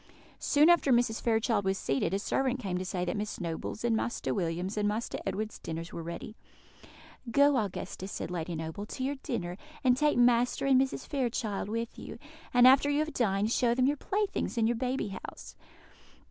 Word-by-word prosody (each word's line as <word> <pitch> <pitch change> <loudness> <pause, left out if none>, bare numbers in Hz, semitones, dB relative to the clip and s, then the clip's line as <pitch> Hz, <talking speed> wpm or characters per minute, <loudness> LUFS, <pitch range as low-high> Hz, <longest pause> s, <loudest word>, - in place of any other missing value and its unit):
Soon 295 +2 +4
after 345 -5 +5
Mrs. 235 -2 +2
Fairchild 225 -2 +1
was 190 0 0
seated, 135 +2 0
a 195 - +1
servant 260 +5 0
came 195 -7 -3
to - - -3
say 180 -1 -2
that - - -2
Miss 210 0 -4
Noble's 170 +5 -4
and 235 -1 +2
Master 235 +2 -1
William's 180 +1 -2
and 210 -1 +1
Master 215 +3 -2
Edward's 210 +3 -3
dinners 165 +1 -6
were 170 - -5
ready. 170 +6 -7 0.9
"Go, 280 +4 +5
Augusta," 195 -3 -3
said 195 - -5
Lady 170 -1 -3
Noble, 160 +6 -5
"to 260 - -5
your 280 +2 -1
dinner, 180 -7 -3 0.3
and 250 -2 +5
take 295 +1 +2
Master 245 +1 +3
and 265 -2 +5
Misses 265 0 -1
Fairchild 235 -7 -2
with 230 +1 -4
you; - - -8 0.3
and, 245 0 +6
after 270 +2 +6
you 290 - +1
have 310 +1 -1
dined, 210 -2 +1
show 240 -1 +2
them 255 0 +3
your 285 +2 +2
playthings 405 - -2
and 225 -1 +3
your 240 - +1
baby 255 -2 -1 0.2
house." - - -12
225 Hz, 190 wpm, -30 LUFS, 190-255 Hz, 0.9 s, and